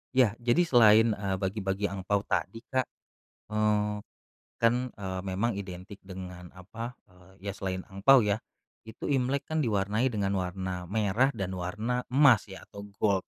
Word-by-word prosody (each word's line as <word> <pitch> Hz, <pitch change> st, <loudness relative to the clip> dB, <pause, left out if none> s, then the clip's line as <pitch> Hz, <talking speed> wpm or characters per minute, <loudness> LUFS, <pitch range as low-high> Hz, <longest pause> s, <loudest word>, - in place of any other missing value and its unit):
Ya, 125 Hz, -5 st, +5 dB
jadi 120 Hz, +8 st, +3 dB
selain, 115 Hz, -6 st, +6 dB
eee, 100 Hz, -2 st, -2 dB
bagi-bagi 95 Hz, +1 st, -2 dB
angpao 100 Hz, +1 st, -1 dB
tadi, 115 Hz, +2 st, -2 dB
Kak. 130 Hz, -2 st, +1 dB, 0.6 s
Eee, 105 Hz, -1 st, +1 dB, 0.6 s
kan, 115 Hz, +1 st, +3 dB, 0.2 s
eee, 95 Hz, -2 st, -4 dB
memang 100 Hz, +5 st, 0 dB
identik 95 Hz, 0 st, -8 dB
dengan 90 Hz, -2 st, -9 dB
apa, 115 Hz, +6 st, -7 dB
eee, 90 Hz, 0 st, -20 dB, 0.2 s
ya -, -, -4 dB
selain 95 Hz, -1 st, -4 dB
angpao 105 Hz, +6 st, +5 dB
ya, 105 Hz, +1 st, 0 dB, 0.5 s
itu 110 Hz, -, -9 dB
Imlek 135 Hz, +2 st, 0 dB
kan 160 Hz, +1 st, -1 dB
diwarnai 105 Hz, 0 st, +1 dB
dengan 100 Hz, -5 st, -1 dB
warna 90 Hz, -1 st, -3 dB
merah 110 Hz, +5 st, +2 dB
dan 95 Hz, -2 st, -3 dB
warna 105 Hz, +7 st, -2 dB
emas 125 Hz, -6 st, +5 dB
ya, 95 Hz, -, -10 dB
atau 100 Hz, 0 st, -10 dB
gold. 100 Hz, -3 st, +2 dB
105 Hz, 150 wpm, -29 LUFS, 95-115 Hz, 0.6 s, selain